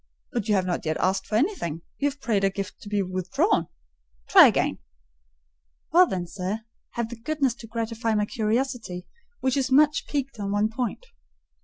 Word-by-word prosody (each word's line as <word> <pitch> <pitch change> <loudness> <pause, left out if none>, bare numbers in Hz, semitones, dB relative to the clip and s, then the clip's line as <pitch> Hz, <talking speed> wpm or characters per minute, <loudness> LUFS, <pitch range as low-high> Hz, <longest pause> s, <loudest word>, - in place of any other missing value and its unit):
But 230 -3 -2
you 210 - +4
have 190 -2 +1
not 180 -2 -2
yet 155 -1 -1
asked 190 +1 0
for 210 - -2
anything; 215 - 0 0.2
you 285 - +2
have 285 0 -11
prayed 215 -7 0
a 195 - +4
gift 195 0 -6
to 205 - -9
be 205 -1 +1
withdrawn: 185 -1 0 0.6
try - - +9
again." - - +1 1.1
"Well 360 +2 +7
then, 180 - -2
sir, 190 +4 -4 0.3
have 235 -1 -2
the 240 - -6
goodness 280 0 0
to 225 - -10
gratify 230 0 -2
my 210 0 +2
curiosity, 220 -5 -2 0.4
which 260 0 +1
is 270 -1 0
much 295 +2 +4
piqued 275 -5 -3
on 200 -1 -2
one 205 +1 +2
point." 245 - -3
220 Hz, 180 wpm, -25 LUFS, 195-260 Hz, 1.1 s, try